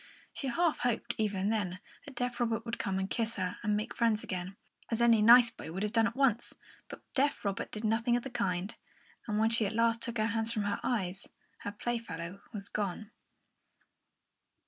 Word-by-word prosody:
She 275 - -2
half 330 +5 +1
hoped, 240 0 0
even 205 -2 0
then, 200 -5 -1 0.3
that 280 - -9
deaf 245 0 -2
Robert 230 -1 0
would 230 0 -4
come 190 -1 -1
and 190 0 -1
kiss 230 +1 -1
her 185 -2 -2
and 210 0 +1
make 215 - -4
friends 225 -2 +2
again, 185 0 -4 0.3
as 230 - -1
any 235 -2 +5
nice 235 +2 +8
boy 160 - -9
would 190 +4 -3
have 210 +1 -2
done 225 -1 +4
at 230 - -5
once; 260 -4 +1 0.3
but - - -9
deaf 280 -4 +1
Robert 200 -1 -2
did 215 - -6
nothing 225 +2 +2
of 245 - -1
the 270 - -6
kind, 180 0 -1 0.5
and 210 -2 0
when 220 +1 +3
she 230 -2 +4
at 215 - -4
last 230 0 +2
took 235 0 -3
her 215 - +2
hands 225 0 0
from 215 -3 -1
her 205 0 -1
eyes, 190 -6 -2 0.3
her 205 - -4
playfellow 200 -5 -4
was 200 -3 -6
gone. 210 +1 -3
225 Hz, 200 wpm, -32 LUFS, 200-235 Hz, 0.5 s, nice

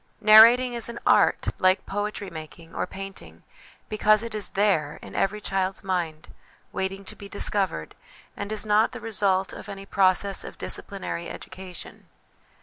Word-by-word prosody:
Narrating 230 +4 +8
is 235 -1 -3
an 235 - -7
art, - - +4
like 185 +1 +3
poetry 205 -1 -4
making 165 +1 -10
or - - -2
painting, 195 0 -10 0.4
because 215 0 +3
it 230 -1 -6
is 210 -3 -3
there, 165 -8 +2
in - - -10
every 210 +2 0
child's 195 -1 -2
mind, 175 -5 -3 0.4
waiting 195 0 -3
to - - -8
be 200 - -11
discovered, 195 - -1 0.4
and 205 +1 -5
is 215 0 -2
not 215 +2 +3
the 250 - -6
result 200 -3 0
of 205 - -9
any 195 -1 -8
process 195 0 +2
of - - -9
disciplinary 190 -3 -4
education. 185 -2 -10
195 Hz, 150 wpm, -25 LUFS, 185-215 Hz, 0.4 s, Narrating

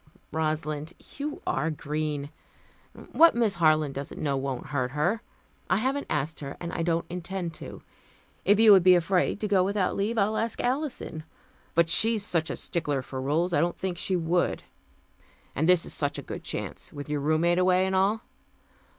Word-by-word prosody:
"Rosalind, 155 0 -2 0.3
you 295 +1 -4
are 160 - 0
green. 150 -1 -3 0.8
What 335 -4 +6
Miss 230 -4 +2
Harland 155 -4 +2
doesn't 140 +1 -6
know 140 -2 0
won't 135 -2 -3
hurt 130 -2 -1
her. 155 +10 0 0.5
I 190 - +3
haven't 265 +6 -1
asked 150 +2 -2
her, 140 -1 -7
and 170 0 -5
I - - -2
don't 165 0 0
intend 175 0 -5
to. - - -9 0.6
If 205 +2 +4
you 225 -1 +8
would 195 -2 +8
be 180 +1 +7
afraid 180 +3 +1
to 215 - 0
go 195 -3 +3
without 195 -1 0
leave, 210 +4 -1
I'll 215 +1 +2
ask 225 0 -2
Alison 255 - -2 0.5
but 170 0 +4
she's 215 +5 +3
such 165 -5 0
a - - -2
stickler 145 -6 -2
for 130 0 -6
rules, 160 +6 0
I 145 - +3
didn't 175 +1 0
think 180 -2 -3
she 190 - 0
would. 175 +1 0 0.9
And 160 +5 0
this 180 -2 +5
is - - -6
such 145 0 -2
a 140 - -6
good - - -7
chance, - - -5
with 145 0 -8
your 150 -1 -1
roommate 160 +4 +2
away, 185 0 +3
and 190 - -1
all. 200 +4 +2
170 Hz, 185 wpm, -27 LUFS, 150-195 Hz, 0.9 s, you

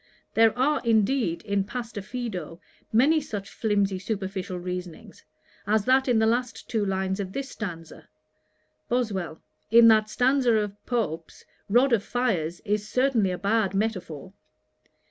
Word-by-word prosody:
There 225 +1 +4
are, 285 +4 +2
indeed, 225 -4 +1
in 200 -2 0
Pastor 230 0 -6
Fido, 190 -8 -6 0.3
many 290 +8 +4
such 200 -7 -6
flimsy 200 -3 0
superficial 190 -2 -4
reasonings, 180 -1 -7 0.4
as 210 0 +2
that 265 +1 +3
in 245 -3 +3
the 220 - +3
last 240 +1 -1
two 220 -3 -1
lines 190 0 -1
of 190 -1 -4
this 275 0 -4
stanza. 165 -7 -8 0.8
BOSWELL. 200 -10 -2 0.3
'In 230 +1 +7
that 215 -1 +4
stanza 250 +1 +2
of 205 -1 -2
Pope's, 170 -10 -3 0.2
"rod 245 +5 +4
of 225 - +3
fires" 185 -11 -1
is 210 0 -1
certainly 250 -6 +2
a 180 - -2
bad 200 -1 0
metaphor.' 190 -5 -3
215 Hz, 140 wpm, -26 LUFS, 190-240 Hz, 0.8 s, In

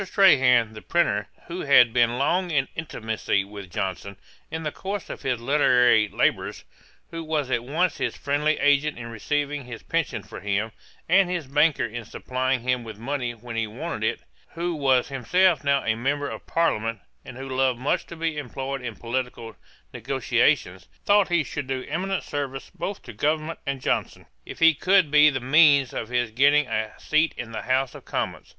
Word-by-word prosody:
Strahan, 130 - +4
the 110 - -10
printer, 105 -12 0 0.2
who 175 +2 -6
had 125 -5 +5
been 120 -1 +2
long 175 +7 +1
in 140 -5 +1
intimacy 110 -9 -2
with 100 -2 -10
Johnson, 95 +2 -4 0.3
in 160 0 -5
the 150 - -2
course 195 +2 -5
of - - -8
his 125 -3 -1
literary 125 -4 +4
labours, - - -1 0.5
who 165 0 -5
was 150 -4 -2
at 115 - 0
once 160 +7 0
his - - -2
friendly 145 +2 0
agent 145 +1 +2
in 115 -1 -7
receiving 145 +4 -2
his 120 -2 -9
pension - - -2
for - - -10
him, 105 +2 -1 0.4
and 185 +1 +4
his 175 -4 -2
banker 140 -1 +2
in 120 +1 -6
supplying 130 +3 -2
him 125 0 0
with 110 -2 -9
money 125 0 -3
when 115 +1 -9
he 115 -1 -1
wanted 105 - -5
it; - - -1 0.3
who 170 +1 -2
was 135 -4 +2
himself 160 +7 +2
now 140 -1 +2
a 110 - +2
Member 140 +5 -1
of - - -9
Parliament, 115 -10 0 0.2
and 125 - -10
who 135 +1 -7
loved 130 -1 +1
much 130 +4 -1
to 170 - -9
be 160 -2 -2
employed 135 0 -5
in 120 -3 -6
political 120 -1 -4 0.4
negociation; 90 +1 +1 0.3
thought 205 -1 +4
he 170 -3 +2
should 145 -1 -5
do 130 -1 -3
eminent 190 +5 -2
service 135 -2 -5
both 200 0 -5
to 120 - -10
government 155 +7 -1
and 135 -1 -2
Johnson, - - -2 0.2
if - - -8
he 165 0 +6
could 185 0 +3
be 150 0 +7
the 135 -2 -2
means 140 0 +4
of 115 - -4
his 120 -2 0
getting 145 +5 +4
a 110 -3 -2
seat 155 +1 +1
in 120 -2 -6
the 110 - -4
House 130 0 0
of - - -11
Commons. - - -4
135 Hz, 185 wpm, -24 LUFS, 120-155 Hz, 0.5 s, be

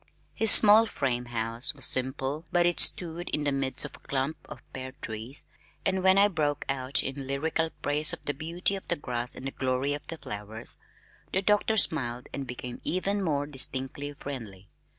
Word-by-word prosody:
His 225 - +2
small 215 +2 +9
frame 125 - -2
house 115 +3 -1
was 130 -3 +5
simple, 130 +3 0
but 175 -1 +3
it 175 0 0
stood 175 0 +3
in 150 - -2
the 145 - 0
midst 135 -1 -1
of - - -9
a - - -17
clump 140 +3 -3
of - - -10
pear 130 0 -7
trees, 110 +5 -3 0.4
and 190 -1 0
when 190 +1 +4
I 200 +1 +6
broke 150 -6 -2
out 135 0 0
in 135 0 -6
lyrical 160 +4 -1
praise 150 +1 +2
of - - -5
the 145 - -1
beauty 170 +6 +2
of 195 - -8
the 175 - +1
grass 125 -5 -3
and 135 +1 -7
glory 130 +2 -1
of 145 - -7
the 165 - -5
flowers, 105 -2 -6 0.5
the 190 - 0
doctor 210 +2 +2
smiled 125 - +2
and 135 -1 -5
became 125 0 -8
even 195 +3 -1
more 145 -5 -1
distinctly 135 0 -4
friendly. 110 -10 -9
140 Hz, 185 wpm, -27 LUFS, 130-165 Hz, 0.5 s, small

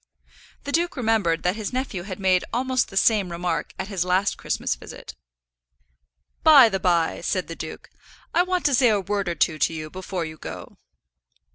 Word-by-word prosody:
The 285 - -5
duke 340 +2 0
remembered 215 -9 +1
that 180 +2 +1
his 215 -2 -4
nephew 255 -7 -3
had 190 +1 -7
made 185 -2 +2
almost 255 0 0
the 195 - -6
same 200 -3 +3
remark 170 -1 -2
at 190 - -4
his 195 -4 -1
last 185 +2 +1
Christmas - - -2
visit. - - -10 1.3
"By 285 -7 +8
the 195 -2 -2
by," 170 -3 +1
said - - -2
the - - -7
duke, - - -8 0.5
"I 340 - +4
want 365 0 -1
to 285 - +3
say 250 -1 +5
a 210 -2 +2
word 200 -1 -2
or 170 - -2
two 155 -2 +1
to - - +2
you 155 -1 -6
before 185 -2 -4
you 155 0 -8
go." - - -9
195 Hz, 185 wpm, -24 LUFS, 175-245 Hz, 1.3 s, By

